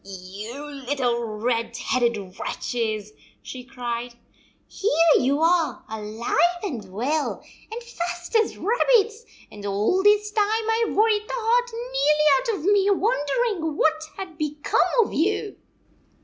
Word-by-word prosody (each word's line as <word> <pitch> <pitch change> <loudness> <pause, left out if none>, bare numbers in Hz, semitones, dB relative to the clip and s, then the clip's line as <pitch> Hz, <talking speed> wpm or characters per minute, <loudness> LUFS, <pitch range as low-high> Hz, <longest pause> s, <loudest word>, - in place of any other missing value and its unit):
"You 195 +7 -8
little 260 -4 -2
red 230 +1 -2
headed 225 -7 -1
wretches," 215 -3 -3 0.3
she 255 -1 -8
cried. 245 -2 -5 0.3
" - - -35
Here 330 -5 +3
you 280 +4 +1
are 335 -1 +2
alive 225 - -1
and 245 - -5
well, 280 +10 -1 0.3
and 470 +2 -6
fat 350 -4 -5
as - - -4
rabbits, 455 0 +2 0.3
and 205 -1 -11
all 205 - +1
this 420 +1 +3
time 420 0 +3
I 450 +1 +1
Ve - - -4
worried 430 0 +2
the - - -3
heart 485 +1 +1
nearly 455 -11 +2
out - - -4
of 380 +5 +2
me 400 0 +3
wondering 390 - 0
what 315 0 +2
had 365 -5 -8
become 300 -1 0 0.2
of - - -7
you 410 +5 0
310 Hz, 135 wpm, -24 LUFS, -, 0.3 s, Here